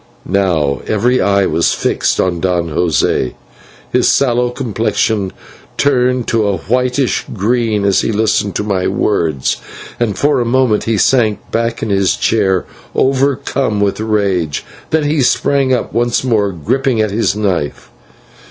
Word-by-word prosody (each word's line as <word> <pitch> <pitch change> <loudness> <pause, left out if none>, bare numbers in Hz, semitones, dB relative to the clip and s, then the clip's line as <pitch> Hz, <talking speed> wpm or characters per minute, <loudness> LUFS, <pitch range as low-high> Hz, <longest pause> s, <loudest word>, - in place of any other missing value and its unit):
Now 85 -8 0
every 120 +4 +1
eye 100 0 +2
was 85 0 +1
fixed - - 0
upon 90 -2 0
Don 90 -2 0
José. 75 -6 0 0.6
His - - +2
sallow 125 -2 +2
complexion 110 -5 -1 0.5
turned 125 -3 +2
to 110 -3 +1
a 100 -1 0
whitish 125 - 0
green 110 0 0
as 100 -1 +3
he - - -1
listened 105 -2 0
to - - -1
my 95 -3 -1
words, 85 -8 0 0.4
and 115 -4 -1
for 145 -2 +2
a - - +1
moment 120 -2 +1
he 115 -1 0
sank 110 -1 +1
back 115 0 -1
in 110 - -2
his 95 -1 +2
chair 95 -5 +1 0.3
overcome 135 -4 0
with 100 0 0
rage. 100 -8 -1 0.2
Then 160 -1 +1
he 145 0 +1
sprung 135 +1 +2
up, 125 - -1
once 120 +1 +1
more 110 -6 +1
gripping 115 - -1
at 110 -2 +1
his 110 0 0
knife. 95 -8 -2
110 Hz, 145 wpm, -15 LUFS, 95-125 Hz, 0.6 s, as